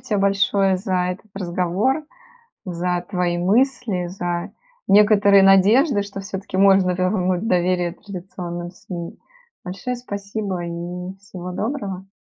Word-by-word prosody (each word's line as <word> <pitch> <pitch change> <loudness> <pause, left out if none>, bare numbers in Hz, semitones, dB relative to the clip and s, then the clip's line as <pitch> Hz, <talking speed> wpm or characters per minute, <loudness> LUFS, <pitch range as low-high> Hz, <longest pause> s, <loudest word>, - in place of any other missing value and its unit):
тебе 210 - -1
большое 195 -1 +2
за 190 0 -3 0.2
этот 200 +3 -14
разговор, 190 - 0 0.6
за 180 -1 -2
твои 180 -3 0
мысли, 215 -1 +1
за 175 -1 -4 0.3
некоторые 205 -1 +6
надежды, 205 - +5
что 200 0 -7
всё-таки 195 -1 -6
можно 190 -1 +5
вернуть 185 +1 0
доверие 180 -1 +1
традиционным 175 -2 -7
СМИ. 175 -2 -8 0.5
Большое 195 +8 -4
спасибо 200 -4 -4
и 175 +2 -6
всего 185 -2 -8
доброго! 195 -4 -4
190 Hz, 115 wpm, -21 LUFS, 180-200 Hz, 0.6 s, некоторые